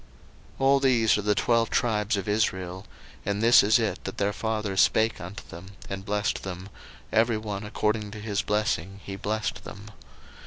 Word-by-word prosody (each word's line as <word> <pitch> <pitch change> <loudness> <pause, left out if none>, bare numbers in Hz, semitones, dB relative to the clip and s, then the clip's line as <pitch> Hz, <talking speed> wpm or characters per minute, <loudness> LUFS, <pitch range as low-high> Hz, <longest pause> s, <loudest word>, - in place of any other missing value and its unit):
01:049:028 - - -24
All 135 +1 +5
these 120 -6 +3
are - - -1
the 105 0 +1
twelve 115 +2 +2
tribes 105 -2 +1
of 100 - -4
Israel: 95 -3 -1 0.4
and 100 +2 -2
this 115 +1 +8
is 105 +2 +4
it 110 -5 -2
that 95 - -6
their 100 +1 0
father 110 -3 -2
spake 110 +4 +3
unto 90 +4 -8
them, 90 +4 -11 0.2
and 95 0 -5
blessed 105 0 -1
them; 95 0 -7 0.4
every 115 0 +3
one 105 -2 -5
according 105 0 -1
to 105 +1 -8
his 105 0 -1
blessing 105 -3 -1
he 100 - -6
blessed 105 +2 -3
them. 100 +2 -10
105 Hz, 180 wpm, -26 LUFS, 100-110 Hz, 0.4 s, this